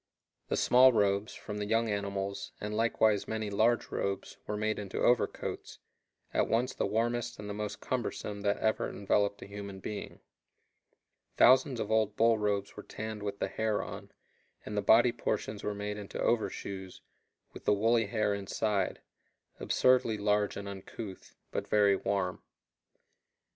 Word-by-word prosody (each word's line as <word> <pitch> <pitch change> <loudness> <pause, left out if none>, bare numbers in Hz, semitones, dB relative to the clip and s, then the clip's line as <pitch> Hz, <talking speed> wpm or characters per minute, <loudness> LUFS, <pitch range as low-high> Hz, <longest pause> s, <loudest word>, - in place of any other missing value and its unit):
The - - -1
small 130 +1 +6
robes, 100 -2 +1
from 105 0 -6
the 105 - -2
young 115 +1 +2
animals, 100 -1 -3
and 105 +1 -4
likewise 110 -2 +2
many 110 -2 -3
large 110 +4 +2
robes, 100 0 -3
were 105 - -2
made 110 0 -1
into 100 -2 -6
overcoats, 120 -1 0 0.6
at - - +2
once 120 +3 +1
the - - -1
warmest 120 +3 -1
and 105 - -7
the 105 - -4
most 105 0 -5
cumbersome 105 -4 -3
that 100 0 +1
ever 110 0 0
enveloped 100 0 0
a - - -8
human 100 -1 -7
being. 105 +2 -6 1.2
Thousands 130 0 +5
of 110 - -3
old 110 -2 +2
bull 115 0 +4
robes 100 -1 -1
were 105 - -7
tanned 110 0 -6
with 100 -1 -4
the - - -1
hair 110 -1 -1
on, - - -8 0.5
and 105 - -5
the 105 - +1
body 115 +4 +6
portions 105 -2 -3
were 105 - -2
made 105 0 -4
into 100 - -7
overshoes, 100 -5 -2 0.5
with - - -11
the - - +4
woolly 115 +1 +3
hair 105 -1 +1
inside 100 +1 -1 0.6
absurdly 125 -4 +3
large 105 0 +1
and 100 0 -6
uncouth, 100 0 -8 0.2
but - - -3
very 100 -2 +4
warm. 95 -1 -1
105 Hz, 155 wpm, -31 LUFS, 100-110 Hz, 1.2 s, small